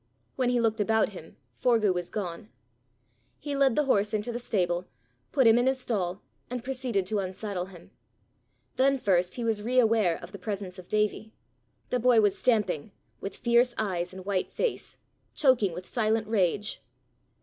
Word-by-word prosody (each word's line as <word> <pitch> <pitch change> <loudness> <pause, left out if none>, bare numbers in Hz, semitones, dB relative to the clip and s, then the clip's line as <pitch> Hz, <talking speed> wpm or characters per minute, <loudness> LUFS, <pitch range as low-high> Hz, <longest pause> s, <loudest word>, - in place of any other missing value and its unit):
When 255 -2 +1
he 245 -1 +2
looked 225 -2 +1
about 220 +1 +2
him, 180 -5 -12 0.2
Forgue 215 - +2
was 175 -1 -3
gone. 195 0 -5 0.9
He 290 -1 -4
led 275 -4 +3
the 300 - +3
horse 210 -5 +2
into 215 +3 -2
the 240 - -4
stable, 180 -6 -1 0.4
put 265 -3 +3
him 225 +1 +6
in 245 - +2
his 265 0 +1
stall, 195 -6 -2 0.3
and 245 -1 -4
proceeded 250 -7 -1
to 210 +2 -1
unsaddle 190 0 -3
him. 180 -3 -14 0.9
Then 275 +1 +4
first 180 -6 +1
he 240 - -4
was 225 -2 0
re 245 +4 -1
aware 220 -8 +4
of 170 - -11
the 200 - -9
presence 190 -1 -5
of 180 - -13
Davie. 215 +1 0 0.6
The 250 - +1
boy 245 -1 +5
was 205 -2 +3
stamping 210 - 0 0.3
with 195 - -6
fierce 240 +1 +3
eyes 180 -4 -1
and 185 0 -10
white 195 -2 -1
face - - -3 0.4
choking 255 - +3
with 180 +2 -7
silent 220 -1 0
rage. 205 -1 0
215 Hz, 170 wpm, -28 LUFS, 185-240 Hz, 0.9 s, him